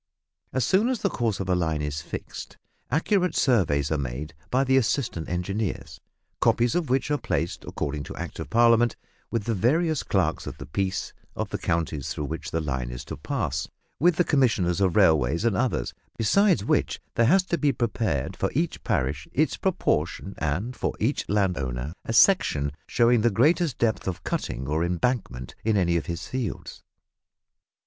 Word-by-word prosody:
As 130 -3 +1
soon 205 - +3
as 255 -3 -2
the 200 - +2
course 115 -5 -1
of 95 - -3
a 90 - +2
line 80 -4 0
is 75 0 -3
fixed, - - -7 0.3
accurate 180 - +1
surveys 80 - +2
are 80 - +1
made 70 +3 -4 0.2
by 130 +2 +2
the 130 0 +2
assistant 120 - 0
engineers, 95 +4 -3 0.4
copies 120 0 +3
of 175 -5 -1
which 135 +3 +1
are 145 - +1
placed, 85 - -2
according 75 0 -3
to - - -8
Act - - -6
of - - -5
Parliament, 120 0 +4 0.3
with 115 -3 -1
the 115 - -1
various 155 - +2
clerks - - 0
of - - -6
the - - -8
peace 95 +4 -2 0.2
of - - -3
the - - -2
counties, 80 -4 -1
through 75 - -3
which 80 +2 -5
the 80 - -1
line 65 -5 -2
is - - -7
to - - -6
pass, 75 - -2 0.3
with 175 +4 +4
the 180 - +3
Commissioners 110 - +2
of 95 -3 +2
Railways 80 - +3
and 115 -4 +2
others, 90 - 0 0.2
besides 175 - +3
which - - +1
there 115 - +3
has 190 +7 +5
to 170 -2 -2
be 145 -2 +3
prepared 110 - -1
for - - 0
each 160 +4 -1
parish 75 - -1
its 155 +3 +2
proportion, 100 - -1
and 90 - -2
for - - -2
each 120 +7 -1
landholder 75 -9 -1
a 115 - -2
section 75 - +4 0.2
showing 120 -1 +3
the 120 - +4
greatest 145 - +2
depth 110 -4 0
of 90 -4 -3
cutting 65 +2 -3
or 80 +3 0
embankment 90 - -1
in 110 -1 +2
any 85 -3 +2
of 85 - -1
his 85 0 -4
fields. 125 -8 -4
100 Hz, 180 wpm, -26 LUFS, 80-130 Hz, 0.4 s, has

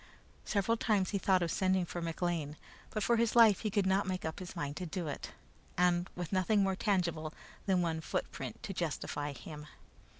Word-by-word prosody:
Several 215 +3 +1
times 205 -4 +1
he 200 - 0
thought 185 -2 +3
of 165 - -1
sending 185 -1 +2
for 175 +1 -5
McLean, 165 -3 -2 0.3
but 215 -2 -2
for 235 +2 +3
his 230 0 +2
life 225 -5 +7
he 215 - -1
could 205 -1 +1
not 190 +1 +2
make 185 -2 -2
up 160 - -3
his 185 -2 -7
mind 145 0 -3
to 180 - -3
do 175 +1 -3
it 145 - -4 0.9
with 175 +1 -4
nothing 195 +2 +3
more 195 -1 +1
tangible 170 -6 0 0.3
than 185 -2 +3
one 160 -1 -1
footprint 130 -5 -4
to 195 - -4
justify 150 -3 -2
him. 150 +1 -9
185 Hz, 190 wpm, -33 LUFS, 160-200 Hz, 0.9 s, life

